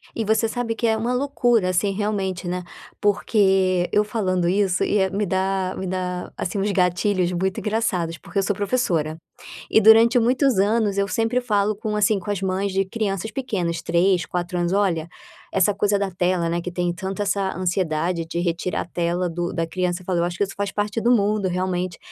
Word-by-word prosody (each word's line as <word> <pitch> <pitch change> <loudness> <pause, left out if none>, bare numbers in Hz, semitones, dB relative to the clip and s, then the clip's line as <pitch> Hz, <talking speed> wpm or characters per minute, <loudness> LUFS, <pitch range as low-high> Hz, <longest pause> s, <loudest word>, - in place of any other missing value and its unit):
E 225 - -1
você 220 +1 +2
sabe 230 0 -3
que 230 0 0
é 220 - +3
uma 230 +3 -1
loucura, 245 -6 +1
assim, 185 +2 +1
realmente, 195 -3 -2
né, 180 +1 -3 0.4
porque, 190 -3 +2
eu 210 - +3
falando 185 -5 -1
isso 190 -1 +1
ia 190 -2 +2
me 205 +2 -1
dá 190 0 -1
me 190 - -4
dá, 180 -1 -3
assim, 180 - -3
uns 205 +1 0
gatilhos 185 0 +1
muito 190 +2 -1
engraçados 200 -6 -1
porque 200 - -4
eu - - +1
sou 205 +1 0
professora. 180 -8 0 0.5
E - - +5
durante 225 +2 +7
muitos 250 0 +2
anos 205 0 +2
eu 200 - +2
sempre 225 +4 0
falo 210 -3 0
com 215 +1 -3
assim, 210 0 +3
com 190 +2 -6
as 200 -3 -1
mães 190 +1 -1
de 195 +1 +1
crianças 195 0 -3
pequenas, 200 -9 -2
3, 175 +1 +2
4 180 0 -3
anos: 175 0 0
"Olha", 180 -5 +1 0.4
essa 195 +1 +3
coisa 205 0 +1
da 200 -1 -1
tela, 175 -1 0
né, 170 +1 -1
que 175 +1 -6
tem 175 -1 -1
tanto 190 +3 -4
essa 195 -1 -1
ansiedade 175 -2 -1
de 170 +1 -3
retirar 175 +1 -1
a - - -8
tela 175 +1 -1
do 175 +1 -3
da 165 -1 -1
criança, 180 +1 -2
eu - - -19
falo: 185 -2 0
"Eu - - +2
acho 175 +1 -3
que - - +3
isso 195 - -8
faz 200 0 -2
parte 210 +2 -2
do 235 - +2
mundo, 210 -3 +2
realmente, 180 -1 -2
190 Hz, 205 wpm, -22 LUFS, 180-210 Hz, 0.5 s, durante